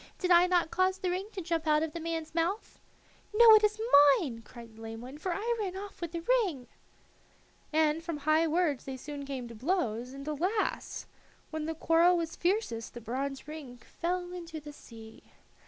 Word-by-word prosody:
Did 365 -1 -1
I 350 +1 +7
not 350 -3 +2
cause 370 +1 +2
the 370 -2 -2
ring 375 +3 -2
to 385 - -4
jump 325 -1 -2
out 305 0 +4
of 320 -1 -4
the 335 - -4
man's 325 -1 -4
mouth?" 340 +6 -2 0.6
"No, 455 0 +9
it 430 0 +7
is 425 +1 +2 0.4
mine," 240 -8 -5
cried 230 0 -13
the 225 - -14
lame 225 0 -7
one, 260 +5 -9
"for 370 - -2
I 445 +7 -1
ran 380 -3 -3
off 400 -1 -9
with 340 -2 -4
the 335 -1 -4 0.2
ring." 290 - -4 1.1
And 315 +1 +2
from 335 -2 -4
high 310 +3 +2
words 315 -4 0
they 265 -1 -5
soon 285 +1 -7
came 260 -3 -5
to 235 - -10
blows, 250 - -1
and, 275 +2 -9
alas! 365 +8 -2 0.5
when 315 -1 -3
the 325 - -3
quarrel 335 +3 +4
was 330 -1 -3
fiercest 345 - -1
the - - -5
bronze 270 +5 -4
ring 295 -5 -8
fell 355 +7 -4
into 335 -3 -7
the 295 0 -10
sea. 225 -5 -13
320 Hz, 195 wpm, -30 LUFS, 275-360 Hz, 1.1 s, No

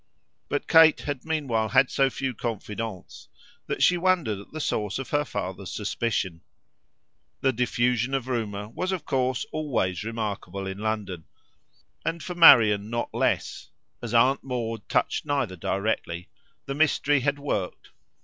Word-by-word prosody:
But - - -2
Kate 160 -1 +6
had 145 -3 -4
meanwhile 135 -9 0
had 130 +6 +4
so 135 -1 +3
few 135 0 -3
confidants 110 -3 -6 0.4
that - - -1
she 180 -1 +4
wondered 170 - +1
at 100 - -13
the 155 - -6
source 105 -9 -1
of 135 - -6
her 145 0 +2
father's 95 -8 -5
suspicions. 100 -5 -2 1.0
The 135 - +2
diffusion 125 +2 +1
of 130 -2 -2
rumour 105 -5 -3
was 185 +11 -3
of 180 -5 -3
course 130 0 0
always 110 - -1
remarkable 105 -4 -4
in 95 +1 -5
London, 105 -6 -3 0.8
and 165 0 -3
for 180 - -5
Marian 110 - +7
not 120 0 -3
less - - -1 0.3
as 120 -1 -4
Aunt 130 +4 +4
Maud 115 -5 -4
touched - - +1
neither 135 -10 -1
directly 90 -2 -2 0.4
the 135 - -3
mystery 145 -1 +2
had 140 +2 0
worked. 105 -10 -4
120 Hz, 145 wpm, -26 LUFS, 105-140 Hz, 1.0 s, Marian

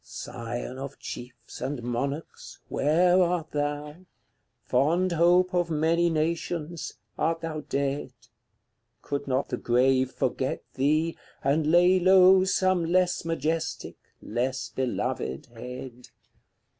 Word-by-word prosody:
CLXVIII. - - -8
Scion 120 +2 -5
of 140 +1 -7
chiefs 125 -1 -9
and 130 -1 -3
monarchs, 140 +6 -4
where 175 +5 +3
art 175 -3 0
thou? 145 +1 -3 0.7
Fond 165 +8 +2
hope 175 +2 +4
of 175 -1 +1
many 165 +2 +2
nations, 165 0 -2 0.3
art 165 +1 0
thou 160 -2 -4
dead? 140 -1 -2 0.9
Could 140 0 -3
not 130 0 0
the 125 - -2
grave 130 +2 +2
forget - - -2
thee, 155 +4 +1 0.3
and 150 +3 +2
lay 180 +3 +5
low 185 +1 +6
Some 185 -2 +2
less 180 +2 +1
majestic, 160 0 -2 0.3
less 125 +2 -2
beloved 105 - -2
head? 125 +1 -8
155 Hz, 115 wpm, -27 LUFS, 130-170 Hz, 0.9 s, low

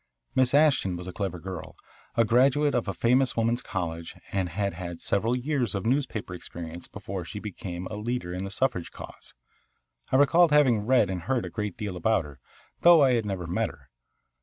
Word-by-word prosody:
Miss 130 +1 +3
Ashton 145 - +4
was 90 +1 -7
a 90 - -6
clever 95 -3 -3
girl, 90 0 -7 0.4
a 115 - +5
graduate 135 +5 +3
of 120 -4 0
a - - 0
famous 125 +7 +2
woman's 115 +2 +1
college, 85 -5 -4 0.2
and 95 -3 -1
had 100 +3 -2
had 85 -1 -6
several 115 +5 +1
years 125 -3 -1
of 100 - -3
newspaper 120 -7 -1
experience 85 -1 -8
before 95 -2 -6
she 105 - -7
became 95 -3 -6
a 105 - -5
leader 110 -5 -3
in 90 +1 -3
the 100 - -4
suffrage 95 -5 -1
cause. - - -10 0.8
I - - +3
recalled 160 +4 +5
having 125 -8 +4
read 120 -7 +4
and 90 -2 -3
heard 120 +7 -1
a - - -7
great 105 -4 -4
deal 105 -4 -4
about 90 -1 +1
her, 70 -3 -12 0.4
though 170 -3 +8
I 130 -2 +4
had 115 -3 0
never 95 -3 -3
met 85 - 0
her. - - -16
105 Hz, 195 wpm, -27 LUFS, 90-125 Hz, 0.8 s, though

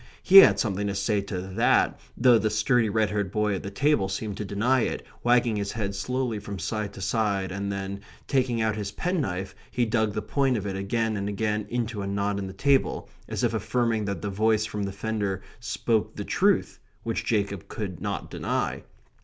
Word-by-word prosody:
He 195 - +7
had 195 - +10
something 100 -2 0
to 100 - -2
say 100 +1 +1
to 100 -2 -4
THAT, 95 +5 +2 0.2
though 120 -2 +6
the 110 - +1
sturdy 110 +2 +2
red 110 -1 +1
haired 100 -3 -1
boy 105 -1 +1
at 95 - -3
the 100 - -5
table 110 -2 +1
seemed 105 0 -3
to - - -3
deny 110 +7 +2
it, - - -2 0.2
wagging 120 -2 +3
his 100 -1 -2
head 100 -3 -2
slowly 125 +2 -2
from 100 -1 -6
side 105 0 -3
to 95 - -9
side; 100 -2 0
and 100 +1 -3
then, 100 0 -4 0.3
taking 125 -4 +1
out 110 -1 +1
his 105 -2 -4
penknife, 105 - -2 0.2
he 125 - 0
dug 110 -2 +1
the 110 - -2
point 135 +2 +1
of 105 - -4
it 95 -1 -3
again 110 +3 -1
and 100 0 -2
again 105 0 -1
into 115 -3 -2
a 100 - -3
knot 100 0 -1
in 95 - -4
the 95 - -7
table, 135 +7 +1 0.2
as - - -3
if - - +2
affirming 115 -3 0
that 100 -5 -4
the 100 - -2
voice 110 +2 +2
from 105 -1 -4
the 100 -1 -2
fender 100 -1 -2 0.2
spoke 115 -1 -1
the - - -5
truth - - +1 0.2
which - - -2
Jacob 100 -4 -1
could 95 -6 -5
not - - -4
deny. - - -2
105 Hz, 205 wpm, -26 LUFS, 100-115 Hz, 0.3 s, had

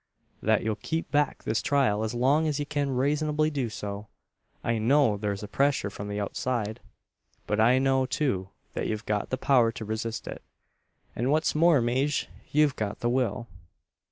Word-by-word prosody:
"That 110 0 +2
ye'll 110 -1 -1
keep 160 -3 -3
back 145 0 +1
this 110 - 0
trial 130 -7 +2
as 110 +2 -3
long's 145 +4 +2
ye 145 - -2
kin 145 -1 -1
raisonably 150 +3 +1
do 130 -5 -1
so. 105 -1 -6 0.6
I 115 -1 0
know 130 0 +4
thur's 100 0 -3
a - - -5
pressyur 135 -3 +1
from 100 +1 -7
the 105 0 -3
outside; 110 +1 -2 0.7
but 105 - -1
I 120 +4 +5
know, 130 0 +2
too, 100 -12 -1 0.2
that - - -2
ye've 110 0 -3
got 105 -1 -1
the 130 - -1
power 125 -4 +3
to 110 - -6
resist 110 +1 -4
it, - - -6 0.7
an 120 +3 0
what's 155 +2 +2
more, 155 -3 +4
Maje 130 +5 0 0.2
yo've 150 -2 +3
got 105 -1 -4
the 120 - +1
will." 120 -2 0
125 Hz, 175 wpm, -27 LUFS, 110-145 Hz, 0.7 s, I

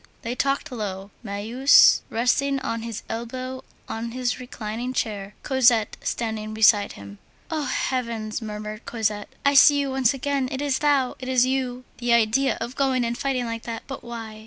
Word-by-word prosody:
They 235 0 -2
talked 275 +3 -1
low. 200 -4 -5
Marius, 230 +6 +5
resting 265 +4 +1
on 230 -4 -3
his 230 -2 -6
elbow 255 +3 -5 0.2
on 230 +1 -5
his 250 0 -1
reclining 245 0 -5
chair, 205 -4 -3
Cosette 240 -5 +3
standing 215 -2 -3
beside 215 -2 +4
him. 100 0 -11 0.3
"Oh, 310 -2 -1
heavens!" 235 -4 -2
murmured 215 0 -6
Cosette, 215 -3 -2 0.2
"I 280 - +5
see 285 +1 +7
you 280 -1 -1
once 265 -3 +3
again! 275 -1 -1
it 265 - -3
is 285 -2 0
thou! 285 -4 +2
it 260 0 -6
is 255 -1 +4
you! 255 -1 -2 0.2
The 240 -1 +2
idea 235 +4 +3
of 235 +3 -5
going 260 -3 +1
and 235 0 -2
fighting 260 -2 -1
like 230 -1 -4
that! 225 -1 -5
But 270 - -7
why? 225 -2 -7
240 Hz, 170 wpm, -24 LUFS, 220-265 Hz, 0.3 s, see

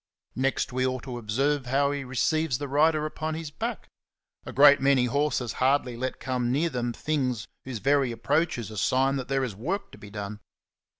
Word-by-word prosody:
Next 130 0 0
we 130 0 0
ought 130 -1 -3
to 125 -3 -5
observe 130 +5 0
how 140 +2 +2
he 140 -1 -3
receives 135 +2 0
the 145 - -4
rider 155 +2 +3
upon 155 +1 -3
his 160 -2 -6
back; - - -4 0.6
a - - -4
good 145 +1 +7
many 135 -2 +4
horses 130 -2 0
hardly 130 -2 +2
let 130 +2 -4
come 125 -2 -1
near 160 +5 +1
them 120 -1 -1
things 125 -4 -2 0.2
who^e 125 -4 -4
very 140 0 +2
approach 150 +7 0
is 115 -3 -6
a 110 - -8
sign 135 +4 +2
that 130 - -4
there 135 0 0
is 125 -5 -3
work 190 - -3
to - - -13
be 105 - -11
done. 105 0 -6
135 Hz, 195 wpm, -27 LUFS, 125-145 Hz, 0.6 s, good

